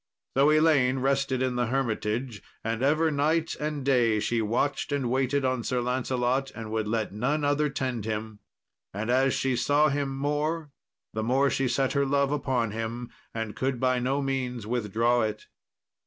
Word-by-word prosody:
So 140 +3 +5
Elaine 155 -4 +4
rested 135 -1 +1
in 125 -1 -1
the 120 -1 +1
hermitage, 115 -2 -2 0.2
and 115 +1 -2
ever 155 +4 +3
night 155 +3 +1
and 150 -2 -3
day 120 -5 +3
she 115 +2 0
watched 115 +6 -1
and 135 -4 0
waited 135 +1 +1
on 130 -2 0
Sir 125 - 0
Lancelot, 125 +1 0
and 110 -2 -7
would 110 -1 -1
let 110 -2 -1
none 135 +8 0
other 145 +1 +2
tend 130 -5 -3
him. 110 -1 -4 0.6
And 110 +4 -1
as 130 +1 +3
she 130 -1 0
saw 145 +4 +3
him 140 -1 -2
more, 150 +2 -1 0.4
the 110 - -2
more 130 +5 +2
she 135 - +1
set 130 +2 +1
her 140 -1 +2
love 140 0 +2
upon 130 -6 0
him, 115 +2 -4 0.2
and 115 -2 -4
could 130 -1 -1
by 130 0 +2
no 135 +3 0
means 125 -4 -2
withdraw 120 +1 +1
it. 110 -1 -3
130 Hz, 170 wpm, -27 LUFS, 115-140 Hz, 0.6 s, So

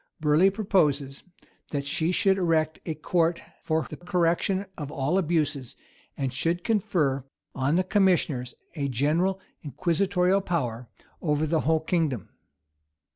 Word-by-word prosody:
Burleigh 155 +5 +4
proposes, 150 -10 0 0.5
that 140 -2 -3
she 160 +4 0
should 195 +1 +2
erect 160 -3 +1
a 160 - -2
court 165 +2 +1 0.2
for 160 0 0
the - - -7
correction 180 +2 0
of 145 -3 -6
all 150 +7 0
abuses, 150 -7 -1 0.4
and 135 -2 -2
should 165 +7 -1
confer 160 - +1 0.3
on 140 +3 0
the 185 - +3
commissioners 175 - +1 0.2
a 145 -5 -2
general 155 +9 +1 0.2
inquisitorial 180 +6 +1
power 125 -10 -2 0.3
over 150 -1 +1
the 160 +1 +1
whole 160 +1 +2
kingdom. 160 - -1
160 Hz, 130 wpm, -26 LUFS, 145-180 Hz, 0.5 s, Burleigh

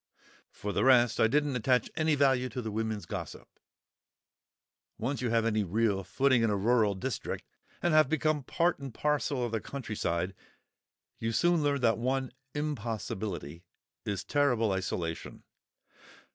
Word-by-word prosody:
For 105 0 -5
the - - +1
rest, 125 -2 +5
I 110 - +6
didn't 145 +2 +1
attach 125 +1 +2
any 155 -1 +2
value 130 -3 +3
to 125 - -4
the 110 - -4
women's 110 -1 -2
gossip. - - -6 1.5
Once 130 +3 -2
you 125 - 0
have 115 0 +2
any 110 -2 +1
real 100 +1 +1
footing 130 +3 +2
in 115 - +3
a 105 - +1
rural 110 -1 +3
district, 125 +7 -4 0.4
and 175 - +2
have 155 -3 +5
become 155 -1 +1
part 170 +6 0
and 135 -2 -6
parcel 140 -1 0
of 120 - -4
the 110 -1 -1
country 130 -6 -6
side, 85 0 -1 0.9
you 115 - -1
soon 170 +7 +3
learn 145 -2 +1
that 115 -2 +3
one 130 +1 -1 0.2
impossibility 110 - -4 0.4
is 100 -1 -3
"terrible 125 -7 +2
isolation." 90 -3 -3
120 Hz, 150 wpm, -30 LUFS, 105-140 Hz, 1.5 s, I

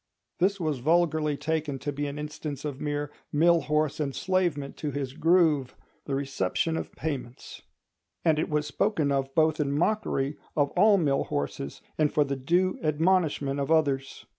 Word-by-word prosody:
This 195 +3 +2
was 155 -6 -1
vulgarly 155 0 +2
taken 155 -3 -2
to 145 +2 -4
be 145 +1 -3
an 140 +1 -5
instance 150 -1 -5
of 140 -2 -5
mere 145 0 -2 0.2
mill 170 +2 +4
horse 150 -1 0
enslavement 150 0 -1
to 150 - -3
his 140 -2 -4
groove—the 150 -5 +1
reception 140 - -1
of - - -4
payments; 135 -6 -6 0.6
and 155 -2 +4
it - - -1
was 150 -1 0
spoken 160 -6 0
of 135 -1 -1
both 160 -1 +3
in 140 -2 0
mockery 150 -4 0 0.2
of 145 -2 +2
all 210 -1 +5
mill 145 -6 +1
horses 70 -1 -4 0.2
and 150 -1 +3
for 150 - +3
the 140 -1 -2
due 175 +8 +1
admonishment 155 -3 +1
of 140 - -2
others. 140 -4 +1
150 Hz, 160 wpm, -27 LUFS, 140-160 Hz, 0.6 s, all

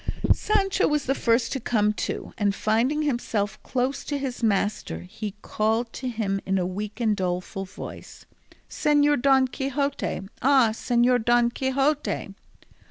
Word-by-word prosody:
Sancho 390 -2 +1
was 300 -2 0
the 270 - +2
first 230 -2 +1
to 270 - -1
come 210 -3 +1
to, - - -4
and 200 -2 +1
finding 245 +10 +1
himself 235 -7 -1
close 255 +2 -1
to 290 - -2
his 265 -3 -4
master 205 - 0
he 200 - -7
called 225 +2 0
to 255 - -4
him 205 -4 -2
in 195 0 0
a 180 - 0
weak 205 +4 -5
and 220 -3 +2
doleful 185 +1 -3
voice, 185 - -10 0.4
"Señor 290 -2 +2
Don 265 -1 +4
Quixote, 275 0 -2 0.2
ah, 265 -3 +5
Señor 245 +1 +2
Don 240 0 +3
Quixote!" 275 +4 -1
240 Hz, 145 wpm, -25 LUFS, 210-270 Hz, 0.4 s, ah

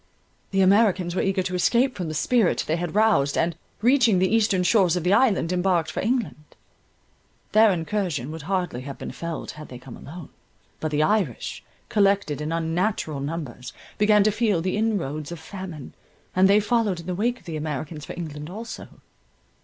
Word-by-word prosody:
The 195 0 +1
Americans 190 -3 +3
were 185 - 0
eager 190 -1 0
to 185 - -4
escape 240 +8 +2
from 180 -4 -4
the 155 - -4
spirit 215 - +2
they 155 - 0
had 175 +1 -4
roused, 210 -11 +3
and, 165 0 +1 0.3
reaching 240 -5 +4
the 185 +3 +2
eastern 205 -5 +2
shores 185 -3 +3
of 180 - -2
the 180 +2 +3
island, 205 -8 +3
embarked 175 -3 +1
for - - -4
England. 230 -8 -1 1.1
Their 215 +1 +6
incursion 165 - -2
would 160 0 -7
hardly 180 -10 -1
have 140 +1 -7
been - - -6
felt 170 -1 -5
had 150 0 -10
they 125 - -8
come 125 0 -11
alone; 160 +1 -10 0.5
but 155 - -2
the 150 0 +1
Irish, 190 - -1 0.2
collected 200 - +1
in 150 +1 -3
unnatural 165 -1 -1
numbers, 140 -4 -5 0.3
began 210 0 +5
to 215 - +3
feel 210 -4 +1
the 185 +3 -1
inroads 170 -9 -1
of 170 - -6
famine, 175 -5 -8 0.4
and 190 +1 +5
they 205 +1 +6
followed 210 -3 +1
in - - -14
the 180 - -2
wake 235 +7 -1
of - - -26
the 165 - -5
Americans 150 0 -4
for - - -7
England 150 -2 -6
also. 220 +5 -7
180 Hz, 185 wpm, -24 LUFS, 155-210 Hz, 1.1 s, Their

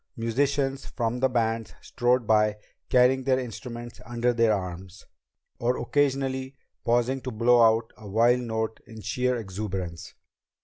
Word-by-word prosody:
Musicians 135 +4 0
from 120 0 -2
the 130 +1 +3
bands 115 -6 -1
strode 125 0 +1
by 105 -1 +3 0.3
carrying 130 +1 +4
their 130 -1 +2
instruments 120 -1 -7
under 120 +1 0
their 115 -1 +3
arms, 95 -1 -5 0.5
or 120 +2 +1
occasionally 135 0 0 0.3
pausing 120 +3 +1
to 130 - -4
blow 120 +1 +4
out 115 0 +3
a 105 - -10
wild 120 +4 +4
note 110 -2 -3
in 110 -1 -10
sheer 125 +5 0
exuberance. 95 -5 -5
120 Hz, 135 wpm, -26 LUFS, 110-125 Hz, 0.5 s, carrying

